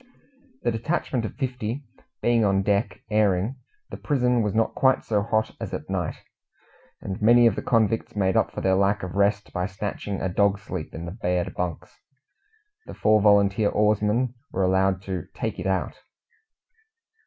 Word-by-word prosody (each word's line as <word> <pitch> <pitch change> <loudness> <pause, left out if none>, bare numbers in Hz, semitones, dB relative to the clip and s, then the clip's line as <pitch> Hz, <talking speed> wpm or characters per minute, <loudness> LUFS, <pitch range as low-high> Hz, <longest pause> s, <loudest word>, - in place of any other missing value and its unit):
The - - +2
detachment 120 0 -2
of - - -6
fifty 125 -1 -3 0.4
being 120 -1 +3
on 95 -1 +2
deck 100 +3 0
airing 105 +3 +1 0.3
the - - -6
prison 125 -4 +1
was 105 -1 -1
not 115 0 +1
quite 130 -1 +3
so 105 -2 0
hot 110 +1 -1
as - - -4
at - - -7
night, - - -2 0.9
and 95 +1 -5
many 120 +2 +6
of 115 -4 +4
the - - -3
convicts 110 -2 +1
made 95 -2 +1
up - - +3
for - - -5
their 95 - +2
lack 100 +1 +2
of 90 - -5
rest 100 +1 +1
by 90 0 -1
snatching 100 0 -4
a - - -1
dog 100 +2 +2
sleep 95 -5 -7
in 80 +1 -6
the 85 - -6
bared 90 -3 -2
bunks. 90 -3 -5 0.9
The - - -8
four 110 0 +3
volunteer 100 0 +4
oarsmen 105 +3 +1 0.2
were 95 - 0
allowed 95 0 +2
to 95 -4 -4
"take - - -3
it 90 - -3
out." 95 -1 -1
100 Hz, 170 wpm, -25 LUFS, 95-115 Hz, 0.9 s, many